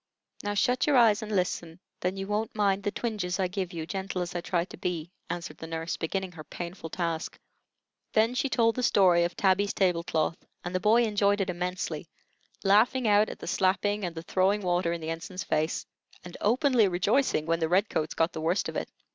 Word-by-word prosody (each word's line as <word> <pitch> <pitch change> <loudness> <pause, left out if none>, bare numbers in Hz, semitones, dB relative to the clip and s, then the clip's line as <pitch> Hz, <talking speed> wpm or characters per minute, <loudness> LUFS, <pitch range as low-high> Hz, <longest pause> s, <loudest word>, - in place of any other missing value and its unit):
Now 205 0 -2
shut 250 +7 +2
your 290 -3 +4
eyes 225 -3 +5
and 215 0 -6
listen; 180 -4 -1 0.2
then 185 +2 -2
you 195 - -3
wont 210 +2 -2
mind 200 -1 +2
the 205 - -1
twinges 205 -4 -3
I 185 - +2
give 185 -1 -3
you, 165 -3 -5
gentle 190 0 -3
as 175 - -6
I 175 - -2
try 175 -1 0
to - - -12
be," 175 -2 -3 0.2
answered 175 0 -5
the 160 - -7
nurse, 165 +1 -3
beginning 190 +3 -3
her 160 -3 -10
painful 170 +1 -7
task. 165 -1 -3 0.7
Then 225 +3 +3
she 275 +2 0
told 230 -3 +3
the 255 - -1
story 180 -7 +4
of 175 - -4
Tabby's 195 +1 +2
table 180 -3 +2
cloth, 160 0 -1 0.2
and 175 - -5
the 185 - +1
boy 220 +4 +4
enjoyed 205 -2 +2
it 190 -2 0
immensely, 175 -3 -3 0.6
laughing 220 +5 +4
out 210 +1 +4
at - - -7
the - - -9
slapping 195 +3 +1
and 175 -2 -3
the 165 - -6
throwing 195 +4 +2
water 175 -2 +1
in 170 -1 -3
the 160 0 -3
ensign's 180 +3 -5
face, 155 -1 -1 0.4
and 180 -1 -10
openly 245 0 +3
rejoicing 190 - +1
when 165 0 +1
the 160 -1 0
red 190 +4 +3
coats 155 -5 -2
got 165 +1 +1
the 160 - -5
worst 170 +5 0
of - - -7
it. - - -3
185 Hz, 215 wpm, -28 LUFS, 170-205 Hz, 0.7 s, eyes